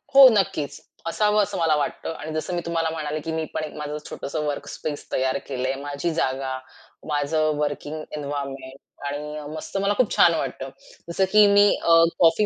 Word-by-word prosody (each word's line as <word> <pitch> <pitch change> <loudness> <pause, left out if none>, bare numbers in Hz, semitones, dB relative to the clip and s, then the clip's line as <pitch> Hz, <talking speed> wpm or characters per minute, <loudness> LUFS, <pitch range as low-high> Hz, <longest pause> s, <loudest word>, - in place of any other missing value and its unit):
हो, 275 -1 +11
नक्कीच. 155 -8 0 0.3
असावं 210 +4 +2
असं - - -4
मला 160 -2 +3
वाटतं. 150 +2 -2
आणि 155 - -6
जसं 165 +3 -3
मी 175 - -1
तुम्हाला 165 -1 0
म्हणाले, 155 -1 -3
की 160 +2 -5
मी 160 0 -1
पण 155 - -2
एक 155 - -6
माझं 150 0 -4
छोटसं 150 +2 -4
वर्कस्पेस 145 +1 -4
तयार 130 +1 +1
केलंय. 130 -1 -1
माझी 145 +4 -2
जागा 130 -3 -1 0.5
माझं 155 +1 +1
वर्किंग 150 +1 -3 0.2
एन्व्हायर्नमेंट 140 -2 -5 0.3
आणि 150 +1 -4 0.2
मस्त 155 +5 -5
मला 200 +1 +2
खूप 255 - +2
छान 170 - +6
वाटतं. 135 -2 -3 0.4
जसं 190 +3 +2
की 210 0 +7
मी 205 0 +6
अ, 165 0 +6 0.2
कॉफी 170 +5 +5
155 Hz, 175 wpm, -24 LUFS, 145-170 Hz, 0.5 s, हो